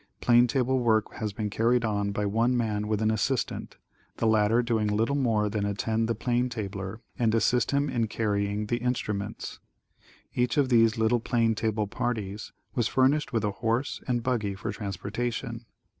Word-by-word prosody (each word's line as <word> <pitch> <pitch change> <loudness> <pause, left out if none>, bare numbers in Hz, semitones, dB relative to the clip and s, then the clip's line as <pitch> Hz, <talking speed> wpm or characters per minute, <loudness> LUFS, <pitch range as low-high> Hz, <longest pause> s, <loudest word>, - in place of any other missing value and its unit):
Plane 120 0 +5
table 130 +1 +1
work 110 -3 +2
has 110 -1 -2
been 105 +1 -4
carried 115 +2 +2
on 100 -2 0
by 105 +1 -1
one 115 +5 +2
man 105 -3 -1
with 110 0 0
an 110 - +3
assistant, 120 +4 -2 0.4
the - - -1
latter 110 +2 +3
doing 115 -3 +1
little 110 +6 +1
more 115 -6 +2
than 105 0 -2
attend 110 +3 0
the 115 - +1
plane 125 +3 0
tabler 100 -2 -5 0.2
and 115 -2 +2
assist 120 +2 +2
him 140 +1 +1
in 120 -4 0
carrying 105 -1 -1
the 120 +3 -1
instruments. 110 -4 -3 0.7
Each 125 0 0
of 140 -3 +3
these 115 -2 +4
little 110 +2 +2
plane 115 -1 +1
table 110 -1 -1
parties 105 -1 -3 0.2
was 120 -3 +1
furnished 135 +2 +2
with 115 -4 0
a 105 - +1
horse 115 +6 -1
and 120 -2 0
buggy 110 -6 -1
for 100 +2 -4
transportation. 115 +4 -4
115 Hz, 175 wpm, -27 LUFS, 105-120 Hz, 0.7 s, Plane